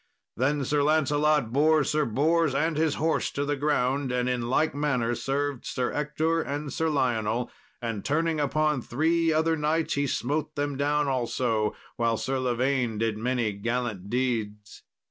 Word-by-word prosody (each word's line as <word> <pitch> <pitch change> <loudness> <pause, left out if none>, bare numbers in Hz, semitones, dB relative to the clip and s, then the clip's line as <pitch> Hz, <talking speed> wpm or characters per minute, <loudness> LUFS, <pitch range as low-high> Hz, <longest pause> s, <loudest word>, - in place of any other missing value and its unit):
Then 140 +3 0
Sir 145 +2 +1
Lancelot 150 -3 +2
bore 155 +2 +4
Sir 150 +1 +1
Bors 155 +5 +2
and 160 +3 +1
his 155 -1 +1
horse 160 +2 0
to 145 - -2
the 145 0 0
ground, 140 -2 0
and 125 0 0
in 120 -2 -1
like 155 +5 +2
manner 130 -5 0
served 140 +1 -2
Sir 125 -1 -2
Ector 155 +3 0
and 145 -1 -4
Sir 160 0 0
Lionel; 120 -4 0 0.3
and 115 -4 -3
turning 160 +2 0
upon 150 -1 +1
three 165 +7 +1
other 160 +1 +2
knights 155 +1 0
he 140 0 0
smote 150 +4 -2
them 145 -1 -2
down 145 +1 +1
also; 120 -4 0 0.2
while 115 -1 +1
Sir 135 +3 -2
Lavaine 125 -2 0
did 110 0 0
many 120 0 0
gallant 110 -2 -3
deeds. 110 -5 -2
140 Hz, 160 wpm, -27 LUFS, 120-150 Hz, 0.3 s, bore